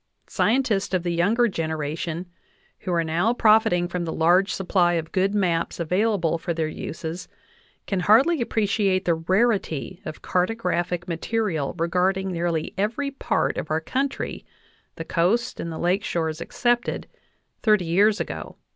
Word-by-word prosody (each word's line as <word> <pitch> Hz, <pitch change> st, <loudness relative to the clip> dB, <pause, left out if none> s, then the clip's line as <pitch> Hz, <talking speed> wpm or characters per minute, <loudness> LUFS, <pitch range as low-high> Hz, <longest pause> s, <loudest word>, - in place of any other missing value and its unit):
Scientists 220 Hz, -6 st, +1 dB
of 180 Hz, -, 0 dB
the 175 Hz, -1 st, -1 dB
younger 210 Hz, +8 st, +3 dB
generation, 160 Hz, -1 st, -3 dB, 0.5 s
who 185 Hz, -, -4 dB
are 170 Hz, -1 st, +2 dB
now 175 Hz, +9 st, +1 dB
profit 220 Hz, -3 st, +5 dB
ing 175 Hz, 0 st, +1 dB
from 180 Hz, 0 st, -3 dB
the 165 Hz, -, -3 dB
large 180 Hz, +5 st, +3 dB
supply 180 Hz, -2 st, +2 dB
of 165 Hz, -1 st, -2 dB
good 195 Hz, +2 st, +1 dB
maps 175 Hz, -5 st, 0 dB
available 180 Hz, -1 st, +1 dB
for 170 Hz, 0 st, -3 dB
their 160 Hz, -1 st, 0 dB
uses, 160 Hz, +2 st, -6 dB, 0.6 s
can 195 Hz, -, -1 dB
hardly 250 Hz, -, +4 dB
appreciate 200 Hz, -4 st, +1 dB
the 170 Hz, -, +3 dB
rarity 185 Hz, -, 0 dB
of 155 Hz, -, -8 dB
cartographic 180 Hz, -3 st, -1 dB
material 170 Hz, -3 st, -2 dB
regarding 185 Hz, +3 st, 0 dB
nearly 170 Hz, -2 st, -2 dB
every 240 Hz, +8 st, -1 dB
part 275 Hz, -, -1 dB
of -, -, -6 dB
our 155 Hz, +1 st, +1 dB
country 265 Hz, -, -3 dB, 0.5 s
the 165 Hz, -, -6 dB
coasts 215 Hz, +10 st, 0 dB
and 170 Hz, -, -4 dB
the 160 Hz, -, -5 dB
lake 180 Hz, +3 st, +1 dB
shores 160 Hz, -1 st, -2 dB
excepted 240 Hz, +6 st, 0 dB, 0.6 s
thirty 210 Hz, -5 st, +3 dB
years 205 Hz, +6 st, +3 dB
ago. -, -, -5 dB
180 Hz, 145 wpm, -24 LUFS, 165-210 Hz, 0.6 s, profit